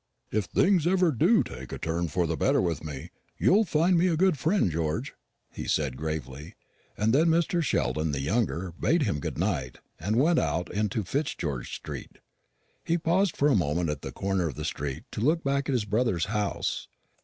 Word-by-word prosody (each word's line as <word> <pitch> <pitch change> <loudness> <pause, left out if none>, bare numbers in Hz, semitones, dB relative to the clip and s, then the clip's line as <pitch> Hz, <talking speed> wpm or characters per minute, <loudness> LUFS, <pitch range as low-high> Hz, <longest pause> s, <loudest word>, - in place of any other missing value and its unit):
"If 110 -3 0
things 180 - +2
ever 180 -2 +3
do 175 - +4
take 65 0 -9
a - - -4
turn 85 +1 -2
for 90 +2 0
the 80 0 -1
better - - +2
with 85 -4 -1
me, 75 +1 -7 0.3
you'll 215 +4 +4
find 170 +1 +3
me 180 - +3
a 165 -3 +1
good 190 0 +3
friend, 155 - +1
George," 80 0 -2 0.4
he - - -6
said 70 -4 0
gravely; 75 0 -5 0.4
and 110 +2 +2
then 155 +5 +4
Mr. 170 +1 +2
Sheldon 80 - 0
the 70 - -2
younger 95 - -1
bade 165 -1 +2
him 100 - 0
good - - -4
night, 80 -9 -1 0.2
and 105 +7 -1
went 160 +7 +4
out 90 +2 -1
into 105 +1 0
Fitzgeorge 85 - -2
street. - - -8 0.7
He 170 - +1
paused 170 +3 +1
for 145 - +3
a 135 - +4
moment 85 -2 +1
at 75 - -5
the - - -6
corner 95 -3 -1
of 70 - -5
the - - -5
street 70 -1 -4
to - - -4
look 160 +7 +2
back 140 0 0
at - - +1
his 120 -5 0
brother's 105 -5 +1
house. 105 -1 -2
105 Hz, 195 wpm, -27 LUFS, -, 0.7 s, do